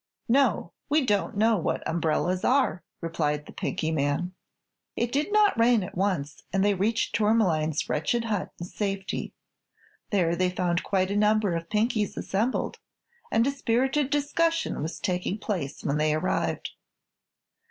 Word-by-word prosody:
"No; 240 -8 +2 0.2
we 295 -1 +3
don't 205 -2 0
know 220 +1 +4
what - - -2
umbrellas 170 +2 0
are," 260 -8 +2 0.2
replied 150 -3 -1
the - - -11
Pinky 160 - -2
man. 155 +4 0 0.6
It 235 0 -1
did 295 +9 0
not 415 - +4
rain 230 -2 +4
at - - -8
once 180 -7 -1
and 195 0 +2
they 205 - +4
reached 215 +5 0
Tourmaline's 185 -8 +2
wretched 160 +11 0
hut 210 -4 -1
in 175 - -4
safety. 195 +1 -3 0.7
There 175 -5 +2
they 185 +1 +1
found 180 -1 0
quite 190 -1 0
a - - -1
number 210 -3 +3
of 165 0 -5
Pinkies 215 0 0
assembled, 220 +7 -1 0.5
and 225 +1 +3
a 280 - +2
spirited 265 +2 +1
discussion 320 - 0
was 160 +3 -4
taking 180 +1 -1
place 180 -10 -4
when 140 +1 0
they 155 0 +2
arrived. 170 +4 -1
200 Hz, 150 wpm, -27 LUFS, 170-230 Hz, 0.7 s, know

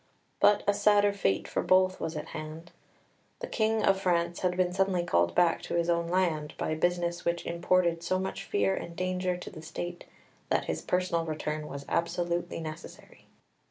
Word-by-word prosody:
But 205 0 +5
a 205 - +5
sadder 205 0 +4
fate 100 - 0
for - - -1
both 185 0 +3
was 160 -1 -3
at 150 +2 -6
hand. 155 +2 -7 0.7
The - - -4
King 220 - +1
of 195 -1 +3
France 170 -2 +1
had 180 -1 0
been 180 -1 +1
suddenly 190 -2 +1
called 85 - +1
back 175 -2 +3
to - - -4
his 170 0 +2
own 170 0 0
land 170 -4 0
by - - -1
business 175 +1 0
which 170 0 -1
imported 170 0 +1
so 185 +2 0
much 190 +1 -4
fear 100 -1 +1
and 170 - -5
danger 185 0 -1
to 180 - -8
the 160 - -10
State 175 +2 -6 0.4
that - - +1
his - - -2
personal 180 -2 0
return 155 -1 -3
was 140 -1 -7
absolutely 175 +1 -1
necessary. 160 +1 -9
175 Hz, 180 wpm, -29 LUFS, 165-185 Hz, 0.7 s, But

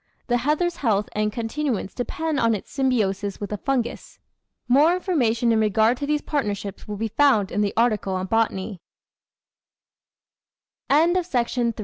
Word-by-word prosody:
The 245 -2 +1
heather's 305 +7 0
health 210 -5 0
and 210 0 -1
continuance 230 -1 -3
depend 315 +3 -2
on 230 -1 +3
its 205 - -8
symbiosis 205 -7 0
with 205 -1 -5
a 210 - -2
Fungus. 250 0 -3 0.5
More 295 +8 +5
information 245 - +1
in 225 - +3
regard 220 +2 +3
to 285 - -4
these 300 0 0
partnerships 205 -8 -3
will 210 -1 -5
be 225 +2 -2
found 225 -5 +3
in 210 - 0
the 205 -1 +1
article 215 -5 +1
on 185 0 -2
BO 200 -2 -1
225 Hz, 135 wpm, -23 LUFS, 210-275 Hz, 0.5 s, More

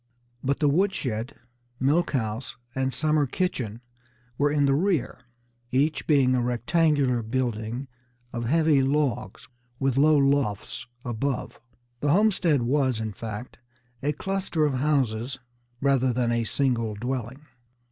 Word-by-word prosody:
But 140 +1 +1
the 150 - +2
wood 190 +7 +2
shed, 115 0 -3 0.4
milk 150 +7 +2
house 115 -1 -2 0.2
and 135 0 0
summer 150 +2 +2
kitchen 120 - -2 0.5
were 145 +3 +2
in 145 -1 +3
the 135 - +3
rear, 170 -1 0 0.5
each 145 +4 +1
being 135 -4 +4
a 125 - +2
rectangular 125 +1 +2
building 120 +1 -2 0.5
of 120 -1 -3
heavy 155 +1 +3
logs, 135 -3 -1 0.3
with 135 -1 0
low 155 +1 +5
lofts 135 -9 0 0.2
above. 125 +3 -3 0.4
The 145 - 0
homestead 180 - +3
was, 130 -2 +1
in 110 -1 -3
fact, 110 +4 -7 0.4
a 145 - +1
cluster 185 -1 -1
of 145 - +1
houses 130 -3 0 0.4
rather 135 -2 +3
than 120 -1 0
a 115 -1 0
single 115 -4 0
dwelling. 125 +4 -4
135 Hz, 130 wpm, -26 LUFS, 120-150 Hz, 0.5 s, low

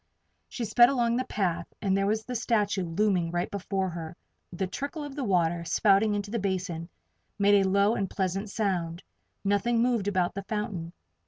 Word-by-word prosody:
She 240 - -4
sped 240 +3 +6
along 240 -3 +1
the 255 - -1
path 175 -4 -1
and 195 -2 +1
there 195 0 +1
was 215 +1 0
the 250 - -5
statue 210 -5 +1
looming 180 0 +1
right 175 +1 -2
before 195 -1 -2
her. 165 -1 -7 0.3
The 180 +2 -2
trickle 280 - -5
of 290 -2 -7
the 285 - -3
water, 175 -5 +1
spouting 200 +5 +3
into 205 0 -3
the 230 - -1
basin, 180 -4 -3 0.5
made 200 -1 +5
a 190 - +1
low 200 +3 +3
and 195 -5 -1
pleasant 195 +2 -2
sound. 180 -5 -2 0.4
Nothing 205 +4 +2
moved 235 -5 +1
about 185 -3 +1
the 200 - -4
fountain. 195 -6 -4
200 Hz, 180 wpm, -28 LUFS, 180-215 Hz, 0.5 s, sped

